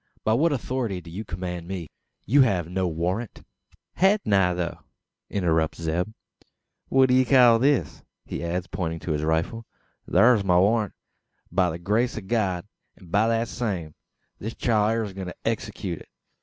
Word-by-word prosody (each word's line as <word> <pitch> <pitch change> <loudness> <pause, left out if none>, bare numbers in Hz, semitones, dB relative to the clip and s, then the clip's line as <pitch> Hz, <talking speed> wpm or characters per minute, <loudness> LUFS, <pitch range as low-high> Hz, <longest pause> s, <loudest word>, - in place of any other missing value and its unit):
"By 110 - +2
what 155 +8 +3
authority 125 -7 -2
do 85 -1 -12
you 100 +6 -5
command 90 -3 -5
me? 90 -5 -6 0.3
You 140 +7 +5
have 95 -10 +2
no 90 +1 -1
warrant?" 90 +7 -3 0.5
"Hain't 195 - +3
I, 95 -2 +4
though?" 85 -1 -3 0.5
interrupts 80 -5 0
Zeb. 85 +3 -1 0.8
"What 135 -1 +4
d'ye 130 +1 +5
call 125 -3 +6
this?" 130 - +1 0.2
he - - -5
adds, 85 +1 -2
pointing 85 -1 -3
to 85 - -3
his 75 -1 0
rifle. 80 +9 -1 0.4
"Thur's 115 -3 +5
my 90 -2 +3
warrant, 105 +2 +2 0.6
by 90 0 +2
the 80 - -4
grace 110 +8 0
o' - - -3
God; 95 -4 -1 0.3
an 90 - -16
by 105 +4 +3
thet 115 0 +1
same, 95 -12 -3 0.5
this 110 +3 -5
chile 110 -2 +2
air 115 0 0
a 100 -3 -6
goin' 95 -1 -6
to 90 - -7
execute - - -3
it. - - -16
95 Hz, 170 wpm, -25 LUFS, 85-115 Hz, 0.8 s, call